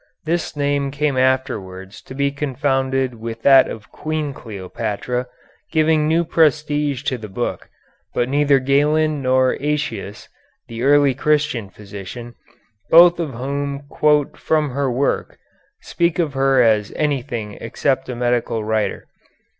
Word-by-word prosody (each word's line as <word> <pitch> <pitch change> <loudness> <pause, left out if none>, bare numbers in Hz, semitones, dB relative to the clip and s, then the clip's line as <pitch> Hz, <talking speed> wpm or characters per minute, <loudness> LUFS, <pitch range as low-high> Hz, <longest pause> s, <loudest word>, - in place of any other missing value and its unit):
This 165 0 -2
name 140 -1 0
came 145 0 -1
afterwards 105 -7 -1
to 130 - -10
be 140 0 0
confounded 135 -2 -1
with 115 0 -7
that 135 -1 +6
of 105 -2 -9
Queen 155 -2 -3
Cleopatra, 110 +3 -4 0.4
giving 155 -1 +2
new 165 +2 +2
prestige 150 -3 +1
to 130 -4 -2
the 110 - -7
book, 95 - -4 0.4
but 120 - 0
neither 140 +1 +3
Galen 145 +3 +2
nor 130 0 +2
Aëtius, 130 -8 -3 0.4
the 115 0 -7
early 140 0 +4
Christian 145 -6 0
physician, 105 +4 -9 0.6
both 170 +1 +7
of 150 -7 -3
whom 140 +2 -3
quote 150 -1 +1
from 155 -3 0
her 135 0 -1
work, 135 +4 -1 0.5
speak 170 -1 0
of 160 -5 0
her 135 -1 +3
as 105 -3 +2
anything 125 -8 -2
except 130 +3 -1
a 125 - -4
medical 120 -2 -1
writer. 110 0 -1
135 Hz, 130 wpm, -20 LUFS, 120-150 Hz, 0.6 s, both